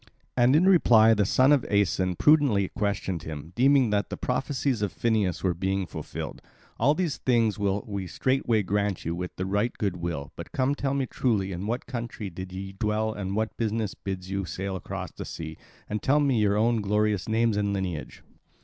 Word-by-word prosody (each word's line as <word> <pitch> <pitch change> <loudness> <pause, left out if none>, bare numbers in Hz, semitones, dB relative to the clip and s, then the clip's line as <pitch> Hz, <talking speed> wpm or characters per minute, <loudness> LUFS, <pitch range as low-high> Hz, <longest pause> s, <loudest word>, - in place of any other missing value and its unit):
And 125 +2 +4
in 165 +4 +5
reply 115 - +6
the 105 -2 +2
son 130 +6 +4
of 145 -4 +4
Aeson 95 -2 +2
prudently 135 - +4
questioned 100 -4 -2
him, 80 +1 -8
deeming 135 -2 +4
that 100 -2 0
the - - -5
prophecies 130 -4 -1
of 105 -3 0
Phineus 105 -1 0
were 95 -2 +2
being 95 +2 -1
fulfilled: - - -7 0.4
"All 140 +6 +4
these 175 -4 -1
things 115 -4 +1
will 100 0 0
we 100 -3 -4
straightway 120 0 +1
grant 100 0 -1
you 85 - -1
with 90 +1 -6
right 100 +5 0
good 100 -4 -1
will. 80 -4 -4
But 85 - -9
come 130 +1 +1
tell 140 -1 -1
me 135 -1 0
truly 105 -7 0
in 95 +3 -4
what 120 +3 -2
country 115 -6 -5
ye 95 +1 -6
dwell 110 +2 -1
and 100 -2 -4
what 110 +1 -1
business 110 -2 -1
bids 95 -1 -6
you 100 0 -1
sail 95 +2 -4
across 95 - -6
the - - -7
sea, 80 -1 -7 0.3
and 105 0 -3
tell 145 +3 +3
me 135 -5 +2
your 105 -1 +2
own 115 +1 +2
glorious 105 -2 0
names 115 0 +2
and 100 -1 0
lineage." 95 -5 -4
105 Hz, 190 wpm, -27 LUFS, 95-120 Hz, 0.4 s, reply